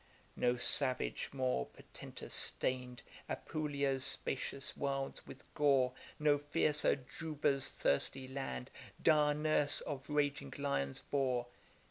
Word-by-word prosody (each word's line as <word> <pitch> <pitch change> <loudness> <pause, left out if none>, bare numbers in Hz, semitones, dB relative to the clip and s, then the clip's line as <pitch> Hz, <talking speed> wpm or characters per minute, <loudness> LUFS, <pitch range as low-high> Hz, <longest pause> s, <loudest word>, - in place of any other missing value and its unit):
No 125 0 +2
savage 130 +1 +2
more 130 - 0
portentous - - -9
stain'd 125 -2 +1 0.3
Apulia's 140 -3 -1
spacious 135 +1 -1
wilds 135 -1 -3
with - - -11
gore; 135 -3 +3 0.2
No 150 -1 +3
fiercer 145 -2 +1
Juba's 150 -4 +1
thirsty 130 - 0
land, 130 - -5 0.3
Dire 150 -2 +5
nurse 150 -1 +2
of 140 -2 -6
raging 145 -1 0
lions, 140 - -1
bore. 130 -4 0
140 Hz, 105 wpm, -36 LUFS, 130-145 Hz, 0.3 s, Dire